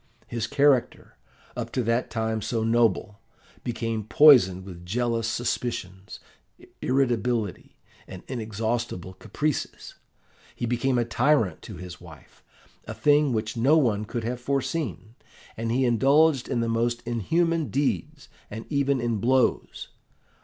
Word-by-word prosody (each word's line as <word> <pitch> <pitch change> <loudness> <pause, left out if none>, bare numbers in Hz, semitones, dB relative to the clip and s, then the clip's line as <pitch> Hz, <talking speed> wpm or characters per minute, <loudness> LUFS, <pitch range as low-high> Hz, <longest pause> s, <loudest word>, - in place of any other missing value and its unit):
His 115 -1 -3
character, 140 -1 +1 0.4
up - - -5
to 125 - 0
that 115 +2 0
time 110 -1 -2
so 115 +2 -2
noble, 115 -2 +1 0.4
became 115 -2 -3
poisoned 105 -7 +6
with 90 -3 -10
jealous 115 +4 -1
suspicions, 115 -5 -4 0.6
irritability, 120 -5 -1 0.3
and 95 - -10
inexhaustible 110 -5 -3
caprices. 150 +9 -4 0.6
He - - -3
became 125 +2 0
a 120 - +1
tyrant 120 - +1
to - - -9
his 90 -1 -9
wife, - - -15 0.4
a - - -7
thing 145 -1 +3
which 110 -1 -2
no 135 +7 +4
one 110 -8 +1
could 115 +2 -4
have 120 +2 -4
foreseen, 125 - -3 0.4
and 115 0 -3
indulged 135 +4 +3
in 120 - -1
the 115 - -1
most 115 +1 -1
inhuman 160 - 0
deeds, 145 +1 -2 0.2
and 110 +2 -7
even 140 -2 +1
in 120 -2 -1
blows. 130 +3 0
120 Hz, 125 wpm, -25 LUFS, 110-135 Hz, 0.6 s, poisoned